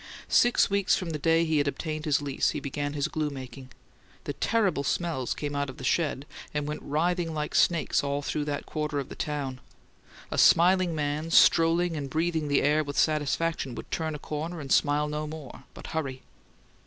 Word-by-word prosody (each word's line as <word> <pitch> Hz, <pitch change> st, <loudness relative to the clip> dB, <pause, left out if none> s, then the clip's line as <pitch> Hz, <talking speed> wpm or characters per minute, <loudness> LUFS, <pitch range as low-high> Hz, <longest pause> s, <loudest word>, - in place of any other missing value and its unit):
Six 245 Hz, 0 st, +4 dB
weeks 200 Hz, -1 st, +2 dB
from 175 Hz, -3 st, -4 dB
the 155 Hz, -, -3 dB
day 165 Hz, +2 st, +3 dB
he 160 Hz, -2 st, +1 dB
had 145 Hz, -, +1 dB
obtained 155 Hz, +2 st, -3 dB
his 145 Hz, -1 st, +1 dB
lease 140 Hz, -2 st, 0 dB
he -, -, -2 dB
began 145 Hz, +1 st, -3 dB
his 145 Hz, 0 st, -1 dB
glue 155 Hz, -3 st, -2 dB
making. 130 Hz, -1 st, -9 dB, 0.5 s
The -, -, -4 dB
terrible 195 Hz, -11 st, +1 dB
smells 140 Hz, -4 st, -1 dB
came 145 Hz, -1 st, -4 dB
out 140 Hz, -1 st, -1 dB
of 130 Hz, -, -9 dB
the -, -, -9 dB
sheds 145 Hz, -1 st, 0 dB, 0.3 s
and 150 Hz, -1 st, -1 dB
went 150 Hz, -, -4 dB
writhing 165 Hz, +2 st, -1 dB
like 150 Hz, 0 st, -3 dB
snakes 170 Hz, -4 st, +2 dB
all 140 Hz, 0 st, -2 dB
through 150 Hz, +1 st, -2 dB
that 145 Hz, -1 st, -3 dB
quarter 150 Hz, -1 st, -3 dB
of 140 Hz, -, -3 dB
the -, -, -8 dB
town. 140 Hz, -4 st, -3 dB, 0.7 s
A -, -, -1 dB
smiling 180 Hz, 0 st, +5 dB
man, 150 Hz, +1 st, -2 dB
strolling 165 Hz, +1 st, +4 dB
and 140 Hz, -3 st, -4 dB
breathing 160 Hz, +1 st, 0 dB
the 145 Hz, -1 st, +2 dB
air 150 Hz, +2 st, +3 dB
with 145 Hz, -1 st, -6 dB
satisfaction, 155 Hz, -2 st, 0 dB
would -, -, -9 dB
turn 160 Hz, -2 st, -2 dB
a -, -, -4 dB
corner 155 Hz, +4 st, -5 dB
and 140 Hz, -3 st, -7 dB
smile 150 Hz, 0 st, +3 dB
no 150 Hz, +1 st, -3 dB
more, 150 Hz, -3 st, -9 dB
but -, -, -10 dB
hurry. 135 Hz, -5 st, -3 dB
150 Hz, 195 wpm, -27 LUFS, 145-165 Hz, 0.7 s, smiling